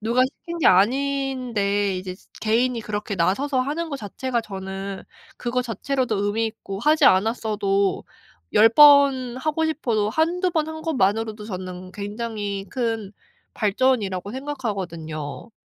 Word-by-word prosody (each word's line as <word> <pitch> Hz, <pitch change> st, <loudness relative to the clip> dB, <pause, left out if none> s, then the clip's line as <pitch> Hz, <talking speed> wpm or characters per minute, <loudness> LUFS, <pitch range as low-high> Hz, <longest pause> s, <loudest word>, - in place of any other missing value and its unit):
누가 235 Hz, +4 st, +2 dB
시킨 340 Hz, +5 st, -6 dB
게 -, -, +2 dB
아닌데 235 Hz, -3 st, +2 dB
이제 185 Hz, 0 st, -6 dB
지 -, -, -23 dB
개인이 235 Hz, +2 st, +1 dB
그렇게 210 Hz, -1 st, -4 dB
나서서 255 Hz, +11 st, +1 dB
하는 305 Hz, +6 st, -2 dB
거 280 Hz, -, -3 dB
자체가 235 Hz, +4 st, -3 dB
저는 195 Hz, -1 st, -6 dB, 0.3 s
그거 250 Hz, +1 st, -1 dB
자체로도 250 Hz, 0 st, -1 dB
의미 220 Hz, +2 st, 0 dB
있고 195 Hz, -3 st, -7 dB
하지 300 Hz, +1 st, +3 dB
않았어도 200 Hz, -2 st, +2 dB, 0.5 s
10 220 Hz, +2 st, +7 dB
번 275 Hz, -3 st, +6 dB
하고 310 Hz, +3 st, 0 dB
싶어도 230 Hz, -10 st, 0 dB
1-2 345 Hz, -, +1 dB
번 315 Hz, -2 st, 0 dB
한 315 Hz, 0 st, -6 dB
것만으로도 220 Hz, -7 st, 0 dB
저는 185 Hz, -2 st, -7 dB
굉장히 205 Hz, -1 st, -4 dB
큰 225 Hz, -5 st, -2 dB, 0.4 s
발전이라고 205 Hz, -4 st, 0 dB
생각하거든요. 190 Hz, -, -5 dB
225 Hz, 285 characters per minute, -23 LUFS, 200-265 Hz, 0.5 s, 10